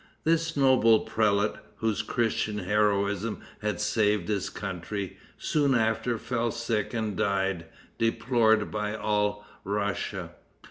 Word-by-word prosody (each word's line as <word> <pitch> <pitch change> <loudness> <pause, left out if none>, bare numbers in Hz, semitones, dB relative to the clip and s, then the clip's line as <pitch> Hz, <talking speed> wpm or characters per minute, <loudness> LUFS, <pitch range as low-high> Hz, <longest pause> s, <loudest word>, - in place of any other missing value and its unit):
This 165 0 +1
noble 130 -5 +5
prelate, 105 -1 +1 0.2
whose 110 -2 0
Christian 110 -3 -1
heroism 105 0 +1 0.2
had 105 -4 -1
saved 105 -5 +1
his 100 -3 -1
country, 100 0 -5 0.2
soon 145 -3 +1
after 115 +1 +1
fell 120 0 -1
sick 115 -2 -2
and 110 -4 -2
died, 95 -4 0 0.3
deplored 115 -1 +2
by 105 0 -2
all 105 -1 0 0.2
Russia. 100 +1 -2
105 Hz, 110 wpm, -28 LUFS, 105-115 Hz, 0.3 s, noble